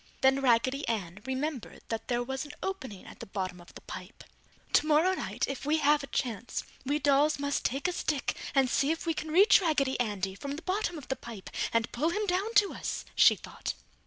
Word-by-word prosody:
Then 265 +1 +4
Raggedy 260 +3 +2
Ann 200 -5 -2
remembered 265 -1 -3
that 225 -1 -3
there 240 -1 0
was 265 +3 -3
an 290 -1 -9
opening 265 - -5
at - - -12
the - - -8
bottom 185 -3 -4
of 175 - -17
the - - -10
pipe. - - -9 0.5
"Tomorrow 310 +5 +4
night - - -2
if 275 - -5
we 300 +2 +2
have 295 0 +4
a 275 - -7
chance, 240 -4 -2 0.2
we 285 +3 +1
dolls 290 +1 +3
must 285 0 -1
take 275 +7 0
a - - 0
stick 295 -5 -1 0.2
and 270 -1 +5
see 275 +2 +1
if 325 +2 -1
we 330 - +1
can 315 0 -5
reach 395 +6 +6
Raggedy 285 -7 +1
Andy 200 -5 -1
from 280 +8 -5
the 325 - -8
bottom 370 -1 -1
of 290 - -9
the 265 - 0
pipe 225 -7 -9 0.2
and 230 0 +1
pull 300 +7 +1
him 420 +5 -1
down 390 +3 0
to 415 -1 +5
us!" - - -4
she - - +7
thought. - - -6
275 Hz, 215 wpm, -30 LUFS, 240-315 Hz, 0.5 s, she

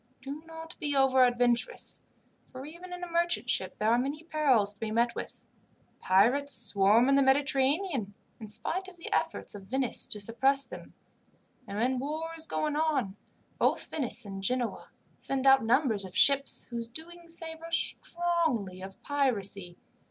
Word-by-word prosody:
Do 275 +3 -7
not 325 0 -10
be 290 -2 -2
over 265 -1 +4
adventurous, 245 -1 +2 0.5
for 260 +1 -8
even 340 +4 -11
in 360 0 -7
a - - -4
merchant 340 0 0
ship - - -2
there 215 +1 +1
are 235 - +3
many 285 +5 -3
perils 270 -11 +1
to 205 - -29
be 225 - -3
met 235 +2 +1
with. - - -8 0.5
Pirates 250 +10 +2
swarm 210 +2 +3
in 275 - +3
the 275 - +5
Mediterranean, 275 - +1 0.2
in 220 - -8
spite 365 - 0
of 370 -1 -13
the 335 - -6
efforts - - -1
of 195 -2 -10
Venice 260 0 -1
to 210 - -2
suppress 265 +6 +3
them; - - -11 0.7
and 200 - -6
when 250 +3 0
war 310 +4 -4
is 320 -1 -2
going 300 -1 -2
on, 290 -11 0 0.4
both - - +1
Venice 265 -7 +1
and 195 -1 -7
Genoa 245 +3 -2 0.3
send 270 -1 -3
out 270 -2 +6
numbers 230 -3 +1
of 185 -1 -7
ships 275 0 +3
whose 235 -1 -4
doings 335 +5 -5
savour 325 0 -6
strongly 335 - 0
of 190 0 -10
piracy. 200 -11 0
270 Hz, 165 wpm, -29 LUFS, 225-315 Hz, 0.7 s, out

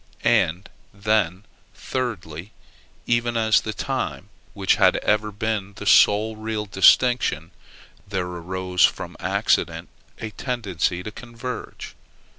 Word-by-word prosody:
And, 90 +5 +2 0.2
then, 100 -3 0 0.3
thirdly, 100 -8 -5 0.5
even 120 0 +1
as 110 -1 +4
to - - 0
the 110 - -3
time, 130 -7 -4 0.3
which 95 -2 +2
had - - +5
ever 105 0 0
been 105 -1 -3
the - - -9
sole 110 +2 +5
real 110 0 -4
distinction, 95 -4 +3 0.6
there 95 -2 -2
arose 90 +1 -2
from - - +1
accident - - 0 0.3
a 110 - -6
tendency 95 -8 -2
to 105 - -6
converge. 120 +2 -8
105 Hz, 115 wpm, -23 LUFS, 95-115 Hz, 0.6 s, had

